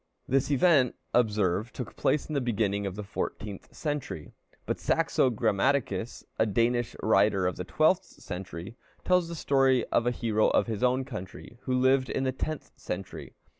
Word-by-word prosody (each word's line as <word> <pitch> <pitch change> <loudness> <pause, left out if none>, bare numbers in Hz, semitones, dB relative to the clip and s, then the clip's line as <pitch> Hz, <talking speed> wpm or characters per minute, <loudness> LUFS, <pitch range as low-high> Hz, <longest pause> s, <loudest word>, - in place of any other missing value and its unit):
This 135 +2 +1
event, 140 -3 +4 0.2
observe, 105 -2 +1
took 125 -5 -7
place 150 - +1
in 155 - -6
the 140 - +1
beginning 100 -4 0
of 95 - -5
the 105 - -5
fourteenth 100 0 -5
century. 140 - -4 0.3
But - - -2
Saxo 130 - +2
Grammaticus, 115 0 0 0.2
a 110 - +4
Danish 120 +3 +1
writer 100 -2 +3
of 90 -2 0
the - - -4
twelfth - - +2
century, 90 +3 -8 0.3
tells 180 -2 +3
the 170 - -6
story 135 -4 +3
of 115 - +2
a - - +5
hero 110 -3 +1
of - - +3
his 110 -3 -4
own 125 +1 +2
country, 110 -1 -9
who 130 -1 +1
lived 130 0 +3
in - - -1
the 130 - +1
tenth 155 +3 -5
century. 95 +1 -7
120 Hz, 170 wpm, -28 LUFS, 100-130 Hz, 0.3 s, a